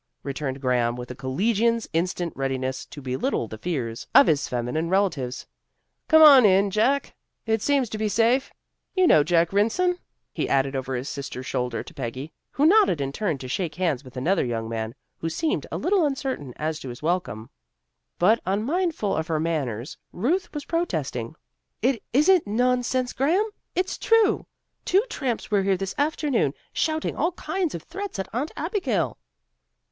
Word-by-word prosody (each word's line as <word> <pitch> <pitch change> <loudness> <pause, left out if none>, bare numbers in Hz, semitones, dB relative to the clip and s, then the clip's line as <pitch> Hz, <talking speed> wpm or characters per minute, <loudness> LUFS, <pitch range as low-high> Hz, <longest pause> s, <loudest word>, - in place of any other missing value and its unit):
returned 140 -1 -4
Graham, 125 -3 +1
with 125 0 -7
a - - -7
collegian's 220 - 0
instant 175 0 -1
readiness 130 -1 -2
to 145 - -10
belittle 130 -2 -1
the 110 0 -9
fears 125 -9 -3
of - - +9
his 150 -4 +1
feminine 125 +7 -2
relatives. 165 -10 0 0.6
"Come 315 -1 +7
on 280 -4 +10
in, 200 0 +4
Jack. 245 +8 +1 0.3
It 220 -1 +1
seems 280 -1 +2
to 215 - -5
be 215 -1 0
safe. 235 +6 +2 0.4
You 370 -1 +4
know 155 - +6
Jack 170 +2 +2
Rynson," 355 - +2 0.3
he - - -2
added 135 0 +1
over 130 0 -3
his 125 +2 -4
sister's 135 -3 -6
shoulder 125 -4 -2
to - - -13
Peggy, 130 +4 -6 0.2
who 285 - +1
nodded 390 - +5
and 135 0 -2
turned 165 -6 -1
to 130 - -6
shake 160 +3 -2
hands 165 -8 0
with 130 -1 -12
another 175 +10 +1
young 115 -2 -3
man, 115 0 -4 0.2
who 165 - -2
seemed 315 - -1
a - - -2
little 375 -1 +2
uncertain 265 - -2
as 155 0 -3
to 130 - -7
his 120 +3 -9
welcome. 155 - -2 0.7
But 215 +6 +4
unmindful 235 - 0
of 160 0 -2
her 160 -2 0
manners, 140 -7 -3
Ruth 310 - -1
was 295 -2 -6
protesting. 155 - -2 0.5
"It 250 -2 +2
isn't 310 - +4
nonsense, 250 +3 +1
Graham. 360 - +1 0.2
It's 370 +1 -1
true. 455 -2 +3 0.4
Two 385 +3 +3
tramps 245 -6 -3
were 205 -1 +3
here 195 -1 +1
this 195 0 -4
afternoon, 285 - +1 0.2
shouting 315 0 -1
all 335 +4 0
kinds 365 -2 -2
of 165 - -7
threats 400 - -6
at 190 - -3
Aunt 265 +7 -2
Abigail." 285 - -1
185 Hz, 170 wpm, -25 LUFS, -, 0.7 s, on